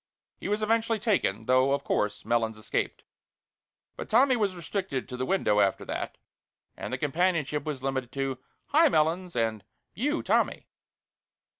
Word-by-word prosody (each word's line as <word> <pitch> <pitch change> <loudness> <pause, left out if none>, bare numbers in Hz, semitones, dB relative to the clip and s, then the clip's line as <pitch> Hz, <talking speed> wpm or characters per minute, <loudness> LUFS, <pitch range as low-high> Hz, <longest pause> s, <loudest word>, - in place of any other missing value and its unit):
He - - -5
was 210 +1 0
eventually 225 +1 +2
taken, 185 - 0
though, 130 +2 +4
of 140 - -1
course, 105 -1 -1
Melons 115 -1 +1
escaped. 110 - -3 0.9
But - - -7
Tommy 255 +4 +5
was 205 -5 0
restricted 175 -6 -3
to 125 - -6
the 130 +1 -3
window 180 - +2
after 100 -2 +2
that, - - -4 0.6
and - - -6
the - - -1
companionship 150 -1 0
was 145 -4 -4
limited 130 -2 -2
to 135 -2 -2 0.3
"Hi, 315 +2 +5
Melons!" 170 - +1
and 110 -3 0 0.3
"You, 295 +8 -1
Tommy!" - - +1
150 Hz, 150 wpm, -28 LUFS, 125-205 Hz, 0.9 s, Tommy